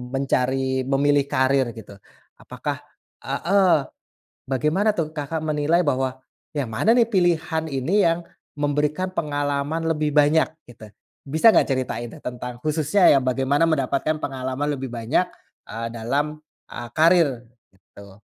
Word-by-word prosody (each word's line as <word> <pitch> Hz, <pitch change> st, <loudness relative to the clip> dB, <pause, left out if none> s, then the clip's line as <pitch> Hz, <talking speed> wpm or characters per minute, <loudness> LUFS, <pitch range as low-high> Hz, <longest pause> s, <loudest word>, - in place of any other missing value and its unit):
mencari 130 Hz, -1 st, 0 dB
memilih 140 Hz, +1 st, +2 dB
karier 130 Hz, -3 st, +1 dB
gitu. 100 Hz, -3 st, -12 dB, 0.4 s
Apakah -, -, -5 dB, 0.4 s
heeh, 185 Hz, -4 st, +2 dB, 0.6 s
bagaimana 155 Hz, -, +1 dB
tuh 165 Hz, -5 st, -2 dB
Kakak 155 Hz, +1 st, -4 dB
menilai 155 Hz, +2 st, +1 dB
bahwa 130 Hz, -4 st, 0 dB, 0.4 s
yang 140 Hz, -6 st, -2 dB
mana 195 Hz, -, +2 dB
nih 235 Hz, -2 st, +3 dB
pilihan 165 Hz, -4 st, +1 dB
ini 160 Hz, +8 st, +1 dB
yang 165 Hz, +1 st, +1 dB, 0.3 s
memberikan 150 Hz, +5 st, -1 dB
pengalaman 145 Hz, -1 st, -2 dB
lebih 150 Hz, -2 st, -1 dB
banyak 150 Hz, +2 st, +4 dB, 0.2 s
gitu? 110 Hz, -2 st, -13 dB, 0.4 s
Bisa 160 Hz, +10 st, +5 dB
nggak -, -, +3 dB
ceritain 130 Hz, -2 st, -2 dB
tuh -, -, -14 dB
tentang 125 Hz, 0 st, -6 dB
khususnya 155 Hz, +5 st, +1 dB
yang 140 Hz, -, +4 dB
bagaimana 135 Hz, +5 st, +1 dB
mendapatkan 140 Hz, +1 st, 0 dB
pengalaman 135 Hz, 0 st, -3 dB
lebih 135 Hz, 0 st, -5 dB
banyak, 120 Hz, +9 st, 0 dB, 0.4 s
eee, 115 Hz, +1 st, -4 dB
dalam 140 Hz, +7 st, -2 dB, 0.3 s
eee 120 Hz, 0 st, -6 dB
karier 160 Hz, -7 st, +3 dB, 0.3 s
gitu? 100 Hz, +1 st, -17 dB
145 Hz, 130 wpm, -23 LUFS, 130-160 Hz, 0.6 s, Bisa